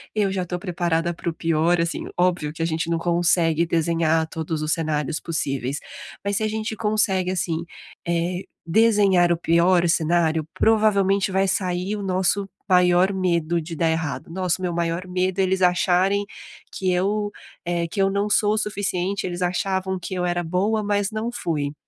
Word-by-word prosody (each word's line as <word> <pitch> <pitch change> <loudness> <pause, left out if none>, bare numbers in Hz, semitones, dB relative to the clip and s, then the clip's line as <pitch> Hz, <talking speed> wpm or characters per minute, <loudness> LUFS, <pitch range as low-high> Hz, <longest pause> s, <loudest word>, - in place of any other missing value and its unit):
eu 205 -3 +1
já 185 -2 -2
tô 180 0 -4
preparada 175 -2 -1
para 170 - -4
o 165 - -4
pior.", 165 +1 +1
assim, 170 0 -2
óbvio 175 -4 +1
que 165 - -7
a - - +1
gente 165 0 -2
não 165 -1 0
consegue 170 -1 +2
desenhar 165 -1 +1
todos 160 -1 -4
os 155 0 +1
cenários 155 -1 -1
possíveis, 140 -4 -2 0.5
mas 200 0 0
se 220 - -1
a - - +1
gente 220 0 -3
consegue, 205 -4 +1
assim, 170 -2 -1 0.4
eh, 175 +2 -1 0.2
desenhar 195 -2 +4
o 170 - +2
pior 170 +1 +3
cenário, 165 -1 +1
provavelmente, 200 -3 +2
vai 190 +1 +2
sair 185 +2 -1
o 205 - -5
nosso 190 +1 0 0.2
maior 180 +1 +4
medo 170 -3 0
de 165 +2 -7
dar 165 +1 +1
errado: 160 -2 -3
"Nossa, 180 -1 0
o - - -7
meu 175 -2 -1
maior 170 +1 -2
medo 185 +1 -1
é 190 - +4
eles 190 0 0
acharem 185 +3 +2 0.5
que 190 - -1
eu, 205 +3 0 0.4
eh, 170 -1 -1
que 195 - -2
eu 195 - +3
não 200 +1 0
sou 210 0 +3
o - - -2
suficiente, 200 -2 -2
eles 175 0 -5
achavam 190 +1 -1
que 180 - -6
eu 180 -1 -1
era 175 0 0
boa, 200 +6 0
mas 205 0 0
não 220 +2 -3
fui.". 150 -10 -2
180 Hz, 180 wpm, -23 LUFS, 165-195 Hz, 0.5 s, desenhar